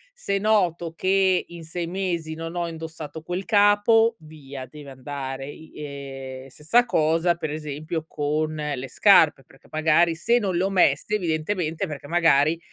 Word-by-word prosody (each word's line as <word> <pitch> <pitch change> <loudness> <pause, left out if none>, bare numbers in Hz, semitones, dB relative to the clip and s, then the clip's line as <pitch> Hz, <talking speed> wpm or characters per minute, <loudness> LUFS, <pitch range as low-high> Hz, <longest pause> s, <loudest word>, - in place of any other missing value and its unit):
se 200 - -2
noto 180 -6 +1
che 190 +1 +2
in 170 -1 -10
6 170 +2 -5
mesi 170 -3 -3
non 165 +1 -6
ho 175 -1 -1
indossato 160 -2 -7
quel 180 +4 -4
capo, 220 +2 +4
via, 140 -4 -10
deve 145 +1 -11
andare, 135 0 -6
i 160 +2 -12
ehm, 135 -2 -8
stessa 160 - +2
cosa, 165 -3 +2
per 160 -2 -4
esempio, 155 +1 -5
con 155 +1 -1
le 145 -4 -4
scarpe, 160 - +5
perché, 135 - -22
magari, 160 +2 +3
se 235 +9 +2
non 195 -5 -1
le 175 - +1
ho 195 - +1
messe 185 0 +2
evidentemente, 165 0 -2
perché, 145 -2 -8
magari, 165 -1 +3
160 Hz, 155 wpm, -24 LUFS, 150-180 Hz, -, scarpe